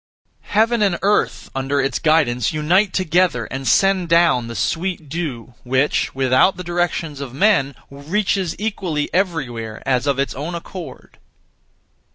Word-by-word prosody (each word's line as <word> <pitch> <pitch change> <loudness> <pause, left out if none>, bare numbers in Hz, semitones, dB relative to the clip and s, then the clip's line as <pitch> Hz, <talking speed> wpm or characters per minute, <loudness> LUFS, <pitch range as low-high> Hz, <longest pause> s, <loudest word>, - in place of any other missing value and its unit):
Heaven 225 +2 +2
and 195 -4 +2
Earth 205 +1 0
(under 135 +1 -1
its 135 - 0
guidance) 130 -7 +2
unite 175 +6 +2
together 175 -8 +1
and 135 0 -4
send 190 +5 +3
down 170 -8 +3
the 115 - -7
sweet 165 - -2
dew, 135 -7 -5
which, 130 +3 0
without 130 +8 +3
the 180 - -6
directions 175 -4 -2
of 130 -2 -7
men, 140 -7 +2 0.2
reaches 180 +5 -1
equally 185 -8 -3
everywhere 125 - -2
as 130 0 0
of 140 -2 +1
its 140 0 -1
own 155 +6 -5
accord. 170 -5 -9
155 Hz, 140 wpm, -20 LUFS, 135-185 Hz, 0.2 s, send